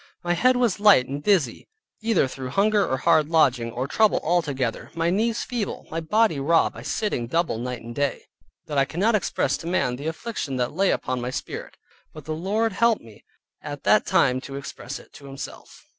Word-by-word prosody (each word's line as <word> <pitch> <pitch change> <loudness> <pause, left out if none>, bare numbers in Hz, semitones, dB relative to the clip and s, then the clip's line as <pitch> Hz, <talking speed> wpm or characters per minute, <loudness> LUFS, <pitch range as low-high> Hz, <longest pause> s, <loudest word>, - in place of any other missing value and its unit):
My 175 0 +1
head 255 +9 +3
was 240 -6 +1
light 205 -11 +6
and 140 +2 -4
dizzy 165 - +1 0.3
(either 220 -10 +2
through 130 0 -6
hunger 205 +7 +3
or 130 - 0
hard 155 +3 +3
lodging, 130 -8 +3
or 125 +3 -3
trouble 215 +7 +3
or 155 - -3
all 175 0 +4
together), 135 -7 -3
my 165 +1 +1
knees 225 +4 0
feeble, 240 -5 -4
my 165 - -2
body 205 0 +2
raw 165 +4 +3
by - - -10
sitting 205 - -2
double 165 -3 0
night 125 -1 -5
and 120 +1 -8
day, 140 +2 -1 0.4
that 145 -2 -1
I 135 - +4
cannot 195 +10 +1
express 210 - 0
to 165 - -8
man 135 -8 0
the 145 +4 -5
affliction 160 - -4
that 125 0 -1
lay 195 +4 +2
upon 130 -1 -1
my 125 - -3
spirit, 130 - -6 0.4
but 155 -2 -11
the 155 - -3
Lord 205 +7 0
helped 230 +2 +2
me 110 -2 -16 0.4
at - - -7
that - - +4
time 125 0 +3
to 135 0 -8
express 140 -1 -7
it - - -16
to 140 - -13
Himself. 135 0 -9
155 Hz, 205 wpm, -24 LUFS, 130-205 Hz, 0.4 s, light